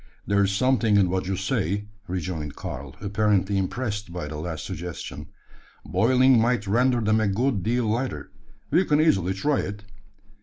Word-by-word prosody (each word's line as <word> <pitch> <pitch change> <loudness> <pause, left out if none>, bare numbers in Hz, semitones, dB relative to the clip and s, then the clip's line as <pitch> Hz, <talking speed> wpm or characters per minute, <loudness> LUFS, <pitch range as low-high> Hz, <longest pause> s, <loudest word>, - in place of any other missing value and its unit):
"There's 100 -1 +2
something 115 -1 +2
in 95 -3 +3
what 95 0 -1
you 95 - 0
say," 100 0 -1 0.2
rejoined 85 -5 -4
Karl, 65 +1 -7
apparently 100 -1 +1
impressed 105 -1 -3
by 85 -3 -5
the 75 +1 -6
last 80 0 -5
suggestion. 85 +1 -6 0.6
"Boiling 130 +1 +4
might 120 -2 +1
render 120 +4 +2
them 110 0 +2
a 110 - +1
good 110 +2 0
deal 120 +4 0
lighter. 120 +4 -2 0.4
We 170 +6 +4
can 150 -4 +2
easily 95 - +3
try 145 +8 +1
it." 100 +2 -5
105 Hz, 155 wpm, -25 LUFS, 95-120 Hz, 0.6 s, Boiling